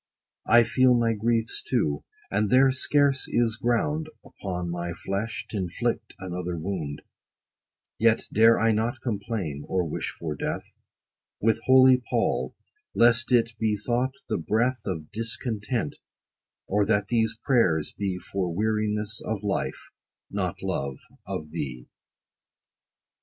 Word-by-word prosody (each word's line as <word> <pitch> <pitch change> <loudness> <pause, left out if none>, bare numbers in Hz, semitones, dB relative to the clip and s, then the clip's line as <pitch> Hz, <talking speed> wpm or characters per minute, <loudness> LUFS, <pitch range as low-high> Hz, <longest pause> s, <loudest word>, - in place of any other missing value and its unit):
20 120 - +7
I - - +6
feel 130 +2 +4
my 115 -1 +2
griefs 115 +1 0
too, 80 - 0 0.3
and 105 +1 +1
there 130 +1 +6
scarce 140 +1 +2
is 115 -2 +1
ground, 135 +7 0 0.2
Upon 90 -3 -5
my 85 0 -3
flesh 100 +6 -3
t' - - -8
inflict 90 -4 -2
another 90 -1 -4
wound: 80 -4 -4 1.0
Yet 115 0 +3
dare 115 +2 +6
I 115 0 +3
not 115 +4 0
complain, 100 - -3
or 90 -2 0
wish 75 - -3
for 80 -3 -5
death, 75 - -3 0.8
With 110 +1 +2
holy 130 0 +7
PAUL, - - 0 0.4
lest 120 +2 +4
it 115 -1 +4
be 110 -2 +1
thought 125 +5 -1
the 110 - -1
breath 120 +8 +1
Of 80 -5 -4
discontent; 115 - -2 0.7
or 105 +2 +2
that 105 -2 +1
these 115 -2 +1
prayers 100 - +2
be 95 -3 -2
For 90 -1 -3
weariness 105 +2 -1
of 105 -2 -3
life, 100 -1 -3 0.4
not - - -3
love 70 -1 -2 0.3
of 75 0 -5
thee. 65 -7 -5
110 Hz, 130 wpm, -26 LUFS, 90-120 Hz, 1.0 s, 20